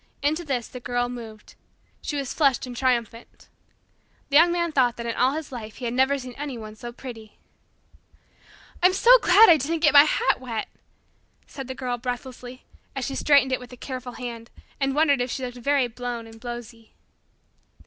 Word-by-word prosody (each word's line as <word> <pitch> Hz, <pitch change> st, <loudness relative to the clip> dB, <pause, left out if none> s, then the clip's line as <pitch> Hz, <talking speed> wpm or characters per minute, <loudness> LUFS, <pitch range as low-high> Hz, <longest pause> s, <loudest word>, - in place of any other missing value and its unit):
Into 310 Hz, +4 st, 0 dB
this 260 Hz, -7 st, -2 dB
the 250 Hz, -, -9 dB
Girl 245 Hz, 0 st, -2 dB
moved. 225 Hz, -3 st, -10 dB, 0.5 s
She 295 Hz, -, -4 dB
was 275 Hz, -3 st, -3 dB
flushed 275 Hz, -6 st, +2 dB
and 250 Hz, -1 st, -8 dB
triumphant. 235 Hz, -2 st, -2 dB, 0.8 s
The 280 Hz, -, -1 dB
Young 340 Hz, +2 st, +6 dB
Man 340 Hz, -1 st, 0 dB
thought 250 Hz, -5 st, +2 dB
that 235 Hz, -, -6 dB
in 230 Hz, -, -2 dB
all 255 Hz, +2 st, +2 dB
his 310 Hz, -1 st, -5 dB
life 220 Hz, -4 st, -8 dB
he 250 Hz, -, -7 dB
had 235 Hz, -, -2 dB
never 265 Hz, +2 st, +2 dB
seen 255 Hz, -2 st, -8 dB
anyone 245 Hz, -7 st, -6 dB
so 240 Hz, +2 st, -8 dB
pretty. 235 Hz, -4 st, -11 dB, 1.4 s
"I'm 365 Hz, +1 st, +5 dB
so -, -, +7 dB
glad 415 Hz, +3 st, +7 dB
I 330 Hz, -, +7 dB
didn't 315 Hz, +4 st, -2 dB
get 300 Hz, -3 st, +4 dB
my 285 Hz, 0 st, +9 dB
hat 270 Hz, -3 st, +1 dB
wet," 230 Hz, -4 st, -4 dB, 0.8 s
said 270 Hz, -3 st, -8 dB
the 260 Hz, -, -6 dB
Girl 250 Hz, -2 st, -3 dB
breathlessly, 250 Hz, 0 st, -6 dB, 0.3 s
as 270 Hz, -2 st, -2 dB
she 275 Hz, -, -4 dB
straightened 280 Hz, -2 st, +3 dB
it 260 Hz, -, 0 dB
with 250 Hz, 0 st, -12 dB
a -, -, -11 dB
careful 255 Hz, -1 st, -7 dB
hand 235 Hz, -2 st, -7 dB, 0.3 s
and 275 Hz, -1 st, 0 dB
wondered 290 Hz, -4 st, +3 dB
if 245 Hz, -, -2 dB
she 260 Hz, +2 st, -3 dB
looked 245 Hz, 0 st, -8 dB
very 275 Hz, 0 st, +2 dB
blown 240 Hz, 0 st, -6 dB
and 225 Hz, 0 st, -14 dB
blowsy. 240 Hz, -2 st, -9 dB
255 Hz, 190 wpm, -24 LUFS, 240-280 Hz, 1.4 s, my